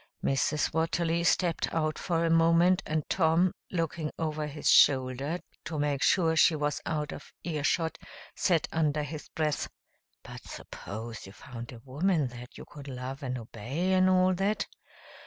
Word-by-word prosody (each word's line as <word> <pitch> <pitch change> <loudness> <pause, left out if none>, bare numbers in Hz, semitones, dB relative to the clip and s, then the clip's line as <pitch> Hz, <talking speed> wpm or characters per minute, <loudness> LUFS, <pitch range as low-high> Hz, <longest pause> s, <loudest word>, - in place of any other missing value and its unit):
Mrs. 145 +2 +1
Watterly 165 +1 +1
stepped 170 0 +1
out 155 -1 -1
for 170 -2 0
a 165 - +2
moment 165 +3 +4
and 155 -1 -1
Tom, 170 +1 +3 0.2
looking 165 -3 -2
over 155 -2 -2
his 150 +1 -4
shoulder 135 +4 +4 0.3
to 160 - -4
make 145 -2 0
sure 165 -4 +3
she 160 0 +5
was 150 -1 -1
out 150 -2 -2
of - - -10
ear 155 -4 -3
shot, 160 +2 0 0.4
said 170 -4 +2
under 150 -2 +1
his 150 +1 -7
breath, 155 -2 -1 0.6
"But - - -9
suppose 115 +1 -8
you 95 - -12
found 120 0 -9
a 120 -2 -11
woman 150 +1 +1
that 120 0 -11
you - - -9
could 145 -1 -11
love 130 +1 -6
and 130 -2 -3
obey, 125 - -2
and 185 0 +4
all 185 0 +4
that?" 195 +4 0
155 Hz, 160 wpm, -29 LUFS, 140-170 Hz, 0.6 s, she